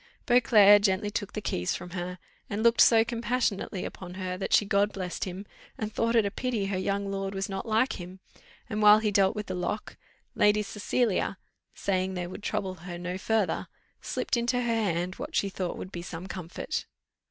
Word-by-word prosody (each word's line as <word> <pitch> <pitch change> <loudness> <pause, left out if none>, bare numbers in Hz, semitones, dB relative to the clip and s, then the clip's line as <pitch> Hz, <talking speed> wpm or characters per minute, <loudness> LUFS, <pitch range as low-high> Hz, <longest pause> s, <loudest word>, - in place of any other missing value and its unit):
Beauclerc 215 -4 +7
gently 205 +1 +1
took 205 0 -3
the 210 - -3
keys 90 - -1
from 175 - -8
her, 180 0 -4 0.3
and 205 +2 -2
looked 235 0 +5
so 225 -1 +7
compassionately 235 -5 -1
upon 180 -1 -8
her, 185 -1 -3
that 190 - -4
she 205 - +5
God 200 +1 +2
blessed 185 -3 -4
him, 190 +2 -6 0.3
and 215 -1 -4
thought 230 +2 +1
it 225 -3 +5
a 200 - -1
pity 235 -3 -2
her 195 -1 -1
young 200 +1 -1
lord 195 0 -3
was 195 0 -2
not 195 +2 -5
like 220 -1 +1
him; 180 +2 -9 0.5
and 215 -2 -2
while 210 0 +9
he 215 -1 0
dealt 195 +1 +3
with 210 -1 -3
the 185 - -4
lock, 185 +4 -3 0.4
Lady 210 0 +3
Cecilia, 210 -1 0 0.4
saying 190 -1 -1
they 180 -1 -2
would 185 +4 -8
trouble 205 -3 -2
her 175 0 -8
no 180 +1 -4
further, 220 -1 0 0.3
slipped - - -1
into 235 +1 +1
her 235 -1 +1
hand 180 -5 0
what - - -6
she 200 - +2
thought 185 -2 -4
would 185 - -7
be 175 - -5
some 175 0 -7
comfort. 185 -2 -5
200 Hz, 200 wpm, -28 LUFS, 185-215 Hz, 0.5 s, while